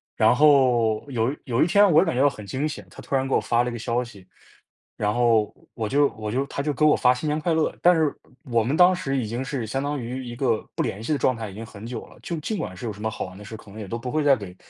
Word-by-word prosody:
然 -, -, +4 dB
后 125 Hz, -6 st, +4 dB
有 120 Hz, +3 st, 0 dB
有 125 Hz, -1 st, 0 dB
一 -, -, +4 dB
天 200 Hz, +3 st, +5 dB
我 160 Hz, +1 st, +6 dB
感 165 Hz, -, -1 dB
觉 130 Hz, -, +2 dB
到 145 Hz, -, +5 dB
很 105 Hz, -6 st, -10 dB
惊 135 Hz, +9 st, -2 dB
险， 145 Hz, -, -8 dB
她 -, -, -12 dB
突 -, -, -3 dB
然 135 Hz, 0 st, +1 dB
给 135 Hz, -, +1 dB
我 -, -, +2 dB
发 120 Hz, 0 st, +1 dB
了 125 Hz, -, -2 dB
一 120 Hz, -, -6 dB
个 -, -, -4 dB
消 120 Hz, +1 st, -1 dB
息。 110 Hz, -6 st, -10 dB, 0.7 s
然 105 Hz, 0 st, 0 dB
后 115 Hz, -3 st, +2 dB, 0.2 s
我 110 Hz, -2 st, -3 dB
就 145 Hz, +1 st, +4 dB
我 110 Hz, -1 st, -6 dB
就 130 Hz, +5 st, 0 dB
她 140 Hz, -, -4 dB
就 145 Hz, +1 st, -1 dB
给 140 Hz, -, -1 dB
我 150 Hz, -, +6 dB
发 125 Hz, 0 st, +4 dB
新 125 Hz, +5 st, -5 dB
年 150 Hz, +1 st, 0 dB
快 165 Hz, +2 st, 0 dB
乐， 160 Hz, -1 st, +1 dB
但 180 Hz, -, +6 dB
是 160 Hz, -3 st, +1 dB, 0.4 s
我 115 Hz, -1 st, +3 dB
们 130 Hz, +7 st, 0 dB
当 180 Hz, +1 st, +7 dB
时 135 Hz, -6 st, -2 dB
已 125 Hz, -, -1 dB
经 120 Hz, +4 st, -3 dB
是 135 Hz, -3 st, -3 dB
相 135 Hz, +5 st, -2 dB
当 145 Hz, 0 st, -2 dB
于 125 Hz, +2 st, -5 dB
一 120 Hz, -1 st, -7 dB
个 120 Hz, -4 st, +1 dB
不 -, -, 0 dB
联 100 Hz, -, -4 dB
系 120 Hz, -, -3 dB
的 -, -, +1 dB
状 130 Hz, -1 st, +1 dB
态 110 Hz, -2 st, -6 dB
已 -, -, -11 dB
经 110 Hz, +3 st, -7 dB
很 105 Hz, -1 st, -11 dB
久 115 Hz, -1 st, -6 dB
了， -, -, -18 dB
就 170 Hz, -, -4 dB
尽 210 Hz, +8 st, -3 dB
管 95 Hz, -, -5 dB
是 90 Hz, -, -8 dB
有 110 Hz, -, -2 dB
什 105 Hz, -, -12 dB
么 110 Hz, -, -1 dB
好 -, -, -4 dB
玩 95 Hz, 0 st, -11 dB
的 105 Hz, -, -11 dB
事， 105 Hz, -, -8 dB
可 105 Hz, -, -16 dB
能 105 Hz, -, -12 dB
也 105 Hz, -, -6 dB
都 115 Hz, -, -3 dB
不 125 Hz, +2 st, -5 dB
会 155 Hz, +2 st, 0 dB
再 140 Hz, -2 st, +5 dB
给 95 Hz, -4 st, -9 dB
125 Hz, 340 characters per minute, -24 LUFS, 110-145 Hz, 0.7 s, 当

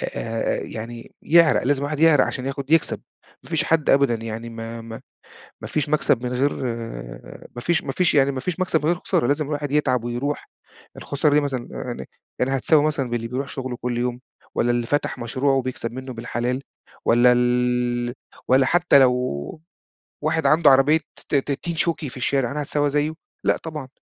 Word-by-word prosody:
آآ، 115 Hz, 0 st, -2 dB
يعني 115 Hz, +1 st, -8 dB
يعرَق، 170 Hz, 0 st, +5 dB
لازم 140 Hz, +1 st, +1 dB
الواحد 145 Hz, +1 st, -3 dB
يعرَق 160 Hz, -3 st, +6 dB
عشان 130 Hz, -, -4 dB
ياخد 140 Hz, +1 st, -4 dB
يكسَب، 165 Hz, -1 st, +2 dB, 0.4 s
ما -, -, -14 dB
فيش -, -, +1 dB
حد 160 Hz, -2 st, +1 dB
أبدًا 140 Hz, -3 st, +4 dB
يعني 115 Hz, +1 st, -6 dB
ما 115 Hz, 0 st, -7 dB
ما 115 Hz, 0 st, -9 dB, 0.6 s
ما -, -, -7 dB
فيش 150 Hz, -2 st, -1 dB
مكسَب 145 Hz, -5 st, +2 dB
من 125 Hz, -, -2 dB
غير 135 Hz, +3 st, +1 dB, 1.0 s
ما -, -, -4 dB
فيش 170 Hz, +7 st, +1 dB
ما -, -, -3 dB
فيش 180 Hz, -2 st, +2 dB
يعني 140 Hz, -1 st, +4 dB
ما 130 Hz, -, -4 dB
فيش 180 Hz, +5 st, -4 dB
مكسَب 180 Hz, -4 st, +1 dB
من 150 Hz, -, -3 dB
غير 170 Hz, -, +3 dB
خسارة، 145 Hz, -, 0 dB
لازم 145 Hz, +3 st, +1 dB
الواحد 145 Hz, -1 st, -3 dB
يتعَب 130 Hz, -5 st, +1 dB
ويرُوح، 120 Hz, +5 st, -3 dB, 0.5 s
الخسارة 145 Hz, +1 st, 0 dB
دي 150 Hz, -, +5 dB
مثلًا 135 Hz, -4 st, -3 dB
يعني، 65 Hz, +1 st, -6 dB, 0.3 s
يعني 135 Hz, +2 st, +1 dB
هتساوي 150 Hz, +3 st, +3 dB
مثلًا 140 Hz, -5 st, -1 dB
باللي 115 Hz, -1 st, -2 dB
بيرُوح 130 Hz, +3 st, -3 dB
شُغله 130 Hz, -2 st, -5 dB
كلّ 120 Hz, 0 st, -3 dB
يوم 125 Hz, 0 st, -2 dB, 0.3 s
والّا 120 Hz, -, +1 dB
اللي 120 Hz, -1 st, 0 dB
فتَح 145 Hz, +4 st, -1 dB
مشروعه 130 Hz, +4 st, 0 dB
و -, -, +3 dB
بيكسَب 125 Hz, -2 st, -4 dB
مِنُّه 130 Hz, +1 st, -7 dB
بالحلال 120 Hz, +2 st, -3 dB, 0.4 s
والّا 120 Hz, +1 st, +5 dB
ال 125 Hz, 0 st, +1 dB, 0.3 s
والّا 130 Hz, +1 st, +5 dB
حتى 175 Hz, -1 st, +4 dB
لو 130 Hz, -2 st, +6 dB, 1.1 s
واحد 160 Hz, -1 st, +1 dB
عَنده 155 Hz, +1 st, +5 dB
عربية 135 Hz, +4 st, +5 dB, 0.3 s
ت -, -, -2 dB
ت 140 Hz, +1 st, 0 dB
تين 170 Hz, +4 st, -4 dB
شوكي 160 Hz, -2 st, 0 dB
في 125 Hz, -, -9 dB
الشارع، 130 Hz, -1 st, 0 dB
أنا 150 Hz, -, -3 dB
هاتساوى 145 Hz, 0 st, 0 dB
زيّه؟ 150 Hz, +2 st, 0 dB, 0.3 s
لأ، -, -, +3 dB
طبعًا، 155 Hz, -5 st, -7 dB
135 Hz, 185 wpm, -23 LUFS, 120-150 Hz, 1.1 s, يعرَق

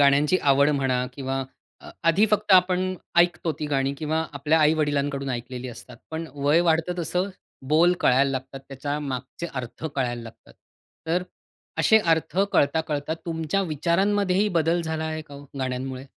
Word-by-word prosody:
गाण्यांची 145 Hz, +5 st, +4 dB
आवड 140 Hz, +1 st, +5 dB
म्हणा 130 Hz, -2 st, +1 dB, 0.2 s
किंवा 135 Hz, 0 st, -3 dB, 0.7 s
आधी 195 Hz, +7 st, +4 dB
फक्त 210 Hz, -1 st, +1 dB
आपण 185 Hz, 0 st, +4 dB, 0.2 s
ऐकतो 175 Hz, -1 st, +3 dB
ती 150 Hz, -, -1 dB
गाणी 135 Hz, -1 st, 0 dB
किंवा 160 Hz, +2 st, -1 dB
आपल्या 150 Hz, +3 st, +1 dB
आई-वडिलांकडून 145 Hz, -3 st, +1 dB
ऐकलेली 125 Hz, +1 st, -5 dB
असतात, 120 Hz, +1 st, -11 dB
पण 160 Hz, +1 st, -4 dB
वय 145 Hz, +4 st, +3 dB
वाढतं 165 Hz, +2 st, +2 dB
तसं 180 Hz, +3 st, -1 dB, 0.4 s
बोल 165 Hz, +4 st, +5 dB
कळायला 135 Hz, +2 st, +4 dB
लागतात. 130 Hz, +1 st, -5 dB
त्याच्या 145 Hz, +2 st, -4 dB
मागचे 135 Hz, +4 st, -5 dB
अर्थ 130 Hz, +4 st, -6 dB
कळायला 120 Hz, -3 st, -2 dB
लागतात. 115 Hz, 0 st, -14 dB, 0.5 s
तर 175 Hz, +3 st, +1 dB, 0.6 s
असे 220 Hz, -, +6 dB, 0.2 s
अर्थ 160 Hz, +3 st, -5 dB
कळता-कळता 150 Hz, +1 st, +1 dB
तुमच्या 165 Hz, +3 st, -1 dB
विचारांमध्येही 190 Hz, +5 st, +2 dB
बदल 165 Hz, +2 st, +2 dB
झाला 160 Hz, -1 st, -3 dB
आहे 155 Hz, 0 st, -3 dB
का 145 Hz, -, -14 dB
हो, 140 Hz, -, -10 dB
गाण्यांमुळे? 130 Hz, 0 st, -3 dB
150 Hz, 145 wpm, -25 LUFS, 135-170 Hz, 0.7 s, असे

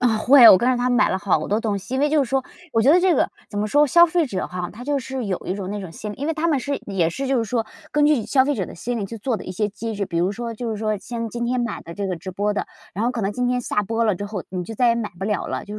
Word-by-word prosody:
嗯， 235 Hz, -3 st, +2 dB
会。 255 Hz, -2 st, +8 dB
我 185 Hz, -, +9 dB
跟 245 Hz, +5 st, +1 dB
着 255 Hz, -, +3 dB
他 245 Hz, +1 st, 0 dB
买 245 Hz, +1 st, +3 dB
了 190 Hz, -, 0 dB
好 160 Hz, -3 st, 0 dB
多 210 Hz, +2 st, +1 dB
东 215 Hz, -3 st, -1 dB
西。 200 Hz, +6 st, -8 dB
因 -, -, 0 dB
为 295 Hz, -, +3 dB
就 295 Hz, -2 st, +3 dB
是 240 Hz, -, -8 dB
说 270 Hz, -1 st, +1 dB, 0.3 s
我 225 Hz, -, +3 dB
觉 270 Hz, -, +5 dB
得 355 Hz, -, +6 dB
这 365 Hz, -1 st, +3 dB
个 -, -, +2 dB, 0.2 s
怎 205 Hz, -, -6 dB
么 210 Hz, -, 0 dB
说 290 Hz, +6 st, +4 dB
消 345 Hz, +5 st, +7 dB
费 340 Hz, -1 st, +1 dB
者 195 Hz, -8 st, -3 dB
哈， 180 Hz, -1 st, -5 dB
他 235 Hz, +4 st, -10 dB
就 285 Hz, 0 st, 0 dB
是 265 Hz, -1 st, -5 dB
有 190 Hz, -3 st, -1 dB
一 185 Hz, -, -1 dB
种 195 Hz, -1 st, -5 dB
那 205 Hz, 0 st, -4 dB
种 190 Hz, -4 st, -7 dB
心 210 Hz, +5 st, -6 dB
理 -, -, -9 dB
因 285 Hz, -, -3 dB
为 325 Hz, -, 0 dB
他 325 Hz, +2 st, -1 dB
们 295 Hz, -4 st, +2 dB
是 280 Hz, +2 st, -2 dB
也 180 Hz, -5 st, +1 dB
是 270 Hz, +11 st, -4 dB
就 265 Hz, -1 st, +2 dB
是 230 Hz, -, +1 dB
说， 230 Hz, -1 st, 0 dB, 0.3 s
根 295 Hz, 0 st, +3 dB
据 290 Hz, -8 st, +2 dB
消 260 Hz, +3 st, +3 dB
费 290 Hz, +1 st, 0 dB
者 190 Hz, -8 st, -2 dB
的 -, -, -10 dB
心 240 Hz, +7 st, -3 dB
理 200 Hz, -, -2 dB
去 225 Hz, +4 st, -8 dB
做 230 Hz, +2 st, -1 dB
的 -, -, -9 dB
一 185 Hz, -, -5 dB
些 210 Hz, +3 st, -1 dB
机 220 Hz, +3 st, -5 dB
制。 200 Hz, 0 st, -2 dB
比 170 Hz, -, -4 dB
如 180 Hz, +3 st, +1 dB
说 230 Hz, +2 st, -5 dB
就 235 Hz, +1 st, -4 dB
是 220 Hz, -, -2 dB
说 215 Hz, -1 st, -1 dB
像 230 Hz, +1 st, -5 dB
今 235 Hz, +1 st, -3 dB
天 250 Hz, +1 st, 0 dB
买 235 Hz, -, -3 dB
的 170 Hz, -, -10 dB
这 200 Hz, +1 st, -3 dB
个 185 Hz, -, -2 dB
直 185 Hz, +3 st, -8 dB
播 205 Hz, +3 st, -1 dB
的， -, -, -3 dB, 0.3 s
然 210 Hz, +4 st, -1 dB
后 245 Hz, -, +1 dB
可 230 Hz, -, -4 dB
能 195 Hz, -, 0 dB
今 250 Hz, +3 st, -1 dB
天 250 Hz, 0 st, 0 dB
下 210 Hz, -3 st, -1 dB
播 230 Hz, +3 st, -1 dB
了 210 Hz, -4 st, +2 dB
之 205 Hz, -, -5 dB
后 200 Hz, -3 st, -5 dB
你 180 Hz, -1 st, -4 dB
就 225 Hz, -, -7 dB
再 245 Hz, 0 st, +3 dB
也 230 Hz, -, +3 dB
买 225 Hz, -3 st, -3 dB
不 190 Hz, -, -5 dB
了 210 Hz, -1 st, -1 dB
了。 -, -, -3 dB
就 205 Hz, -, -8 dB
225 Hz, 380 characters per minute, -22 LUFS, 200-255 Hz, 0.3 s, 我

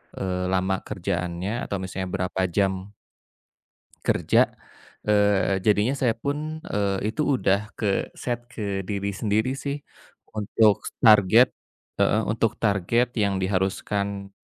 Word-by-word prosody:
eee, 90 Hz, -1 st, -2 dB
lama 95 Hz, 0 st, +1 dB
kerjaannya 90 Hz, +6 st, -3 dB
atau -, -, -1 dB
misalnya 95 Hz, 0 st, -4 dB
berapa 95 Hz, 0 st, -2 dB
jam 95 Hz, +1 st, -1 dB, 1.2 s
kerja, -, -, +3 dB, 0.7 s
eee, 100 Hz, -2 st, +3 dB
jadinya 105 Hz, +5 st, +3 dB
saya 120 Hz, -4 st, +2 dB
pun, 150 Hz, +6 st, -4 dB
eee, 100 Hz, 0 st, -1 dB
itu 150 Hz, -, -2 dB
udah 100 Hz, -4 st, +2 dB, 0.2 s
ke-set 115 Hz, +3 st, -1 dB
ke 110 Hz, -, -6 dB, 0.3 s
diri 100 Hz, 0 st, -2 dB
sendiri 105 Hz, +4 st, 0 dB
sih 140 Hz, +1 st, -3 dB, 0.6 s
untuk 105 Hz, 0 st, +2 dB, 0.2 s
target 110 Hz, +2 st, +7 dB, 0.5 s
heeh, 110 Hz, -, +3 dB
untuk 115 Hz, 0 st, +1 dB
target 115 Hz, +4 st, +2 dB
yang 100 Hz, -2 st, +1 dB
diharuskan 100 Hz, +1 st, -1 dB
100 Hz, 110 wpm, -25 LUFS, 95-110 Hz, 1.2 s, target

